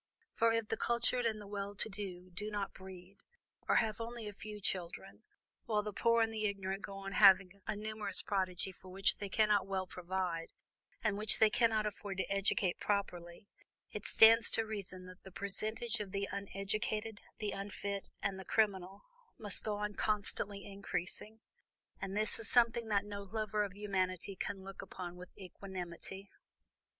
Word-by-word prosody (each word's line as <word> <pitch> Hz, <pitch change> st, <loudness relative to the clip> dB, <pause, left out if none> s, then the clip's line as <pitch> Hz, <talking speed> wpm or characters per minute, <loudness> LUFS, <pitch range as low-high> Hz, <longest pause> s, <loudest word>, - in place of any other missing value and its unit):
For 230 Hz, 0 st, +4 dB
if 225 Hz, -1 st, +1 dB
the 225 Hz, -, 0 dB
cultured 240 Hz, 0 st, +2 dB
and 220 Hz, -1 st, -1 dB
the 205 Hz, -, -9 dB
well 200 Hz, 0 st, -4 dB
to 200 Hz, -, +1 dB
do 185 Hz, -3 st, -6 dB
do 210 Hz, +4 st, -2 dB
not 205 Hz, -2 st, -2 dB
breed, 190 Hz, 0 st, -11 dB, 0.5 s
or -, -, +4 dB
have 220 Hz, 0 st, +2 dB
only 230 Hz, -1 st, -5 dB
a 210 Hz, -, -5 dB
few 210 Hz, +1 st, -8 dB
children, 185 Hz, -2 st, -3 dB, 0.4 s
while 210 Hz, -2 st, +1 dB
the 210 Hz, 0 st, -4 dB
poor 230 Hz, +2 st, +4 dB
and 225 Hz, 0 st, -1 dB
the 215 Hz, -1 st, -1 dB
ignorant 195 Hz, -1 st, -3 dB
go 200 Hz, -, -6 dB
on 195 Hz, 0 st, -6 dB
having 195 Hz, -1 st, +6 dB
a 215 Hz, -, -1 dB
numerous 215 Hz, 0 st, 0 dB
progeny 190 Hz, -2 st, 0 dB
for 185 Hz, 0 st, -15 dB
which 195 Hz, +1 st, +2 dB
they 200 Hz, -, -4 dB
cannot 210 Hz, -1 st, +3 dB
well 190 Hz, -1 st, -1 dB
provide, 180 Hz, -2 st, -3 dB, 0.5 s
and 210 Hz, -2 st, +1 dB
which 215 Hz, +1 st, +4 dB
they 220 Hz, -1 st, +6 dB
cannot 225 Hz, -3 st, +3 dB
afford 205 Hz, -2 st, -4 dB
to 190 Hz, -, -2 dB
educate 195 Hz, -2 st, +2 dB
properly, 185 Hz, -2 st, -2 dB, 0.4 s
it -, -, -5 dB
stands 225 Hz, +1 st, +7 dB
to 225 Hz, -, +2 dB
reason 195 Hz, -4 st, -5 dB
that 185 Hz, 0 st, -12 dB
the 190 Hz, -, -12 dB
percentage 215 Hz, +4 st, -1 dB
of 205 Hz, -2 st, -4 dB
the 200 Hz, 0 st, -1 dB
uneducated, 210 Hz, +2 st, -2 dB, 0.2 s
the 210 Hz, -2 st, -2 dB
unfit 200 Hz, 0 st, -4 dB
and 195 Hz, -1 st, -1 dB
the -, -, -6 dB
criminal, 195 Hz, -3 st, +1 dB, 0.3 s
must 205 Hz, -3 st, 0 dB
go 215 Hz, -1 st, -1 dB
on 210 Hz, 0 st, -2 dB
constantly 205 Hz, -1 st, 0 dB
increasing. 200 Hz, +2 st, -4 dB, 0.6 s
And 195 Hz, +1 st, -3 dB
this 215 Hz, +1 st, +2 dB
is 225 Hz, -, 0 dB
something 235 Hz, -1 st, +4 dB
that 205 Hz, -1 st, +2 dB
no 205 Hz, -1 st, -5 dB
lover 215 Hz, +1 st, -1 dB
of 195 Hz, -2 st, -5 dB
humanity 195 Hz, -2 st, -1 dB
can 190 Hz, +1 st, -4 dB
look 195 Hz, 0 st, -7 dB
upon 175 Hz, -1 st, -7 dB
with 180 Hz, 0 st, -10 dB
equanimity." 190 Hz, 0 st, -6 dB
200 Hz, 175 wpm, -35 LUFS, 190-215 Hz, 0.6 s, stands